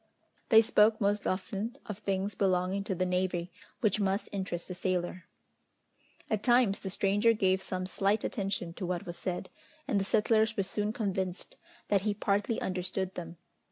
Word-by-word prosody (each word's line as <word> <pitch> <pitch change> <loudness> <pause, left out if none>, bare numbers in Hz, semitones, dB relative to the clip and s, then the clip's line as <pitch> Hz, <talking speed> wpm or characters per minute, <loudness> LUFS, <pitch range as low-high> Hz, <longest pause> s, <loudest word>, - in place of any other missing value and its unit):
They 225 -2 +8
spoke 215 0 +4
most 205 0 +1
often 200 +5 -2
of 210 -1 -6
things 195 -1 -1
belonging 185 +1 +1
to 190 - -1
the 185 +1 0
navy, 180 -1 -1 0.3
which 215 -3 +2
must 200 +1 0
interest 185 -3 -3
a - - -2
sailor. 180 0 -2 1.0
At 215 -2 0
times 240 -5 +4
the 190 - -5
stranger 205 +4 +3
gave 190 -3 +2
some 185 -1 -3
slight 200 +3 +1
attention 195 -4 -2
to 185 - -5
what 175 -1 -2
was 175 0 -5
said, 185 0 -3 0.4
and 205 - +2
the - - 0
settlers 220 +2 +2
were 195 - +2
soon 210 +2 -1
convinced 190 -4 -2 0.3
that 200 -2 +3
he 205 +1 0
partly 205 +1 0
understood 185 +1 -2
them. 170 -1 -7
195 Hz, 165 wpm, -31 LUFS, 185-210 Hz, 1.0 s, They